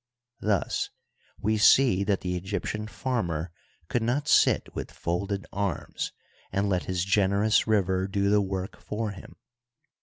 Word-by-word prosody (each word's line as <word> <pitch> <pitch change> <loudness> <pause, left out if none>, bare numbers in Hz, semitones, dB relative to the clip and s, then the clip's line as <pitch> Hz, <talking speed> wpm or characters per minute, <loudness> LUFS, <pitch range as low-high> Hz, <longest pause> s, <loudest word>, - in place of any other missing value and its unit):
Thus 105 -4 0 0.5
we 110 +1 +1
see 115 -3 +6
that 100 -2 +1
the 90 0 -2
Egyptian 100 +3 -3
farmer 90 - -2 0.4
could 120 - 0
not 130 +6 0
sit - - +4
with - - -5
folded 100 +3 -3
arms 100 -6 -2 0.4
and 100 +2 0
let 95 -3 0
his 90 -1 -1
generous 100 +3 +3
river 95 -3 +2
do 100 +1 +1
the 105 0 +5
work 95 -1 -4
for 105 0 -3
him. 100 - -11
100 Hz, 140 wpm, -27 LUFS, 95-105 Hz, 0.5 s, see